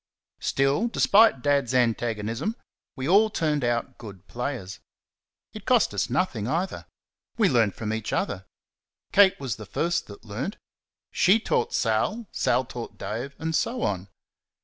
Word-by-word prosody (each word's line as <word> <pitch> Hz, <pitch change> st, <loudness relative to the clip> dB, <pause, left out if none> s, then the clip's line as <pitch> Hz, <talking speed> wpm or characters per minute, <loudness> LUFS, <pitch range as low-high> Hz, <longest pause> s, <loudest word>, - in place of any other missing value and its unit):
Still, 135 Hz, +11 st, +1 dB
despite 215 Hz, -, +4 dB
Dad's 140 Hz, -4 st, +1 dB
antagonism, 115 Hz, -, 0 dB, 0.4 s
we 130 Hz, -1 st, -4 dB
all 205 Hz, +5 st, +5 dB
turned 150 Hz, -7 st, 0 dB
out 120 Hz, -1 st, -1 dB
good 100 Hz, -5 st, -11 dB
players. 120 Hz, -, -5 dB, 0.7 s
It -, -, -10 dB
cost -, -, +3 dB
us -, -, -1 dB
nothing 105 Hz, 0 st, -1 dB
either. 170 Hz, +8 st, -2 dB, 0.5 s
We 220 Hz, -4 st, +4 dB
learnt 115 Hz, -, +2 dB
from 110 Hz, -1 st, -3 dB
each 110 Hz, 0 st, -3 dB
other. 95 Hz, -1 st, -2 dB, 0.6 s
Kate 195 Hz, -2 st, +5 dB
was 130 Hz, -7 st, -3 dB
the 110 Hz, -, -9 dB
first 170 Hz, -, -1 dB
that 100 Hz, +2 st, -12 dB
learnt. 125 Hz, -, -4 dB, 0.5 s
SHE 200 Hz, +5 st, +4 dB
taught 460 Hz, -, 0 dB
Sal. 230 Hz, +2 st, 0 dB
Sal 130 Hz, -, +1 dB
taught 120 Hz, -1 st, -8 dB
Dave, 125 Hz, +6 st, -5 dB
and 160 Hz, +1 st, -3 dB
so 245 Hz, +7 st, 0 dB
on. 95 Hz, -1 st, -2 dB
130 Hz, 145 wpm, -26 LUFS, 110-185 Hz, 0.7 s, all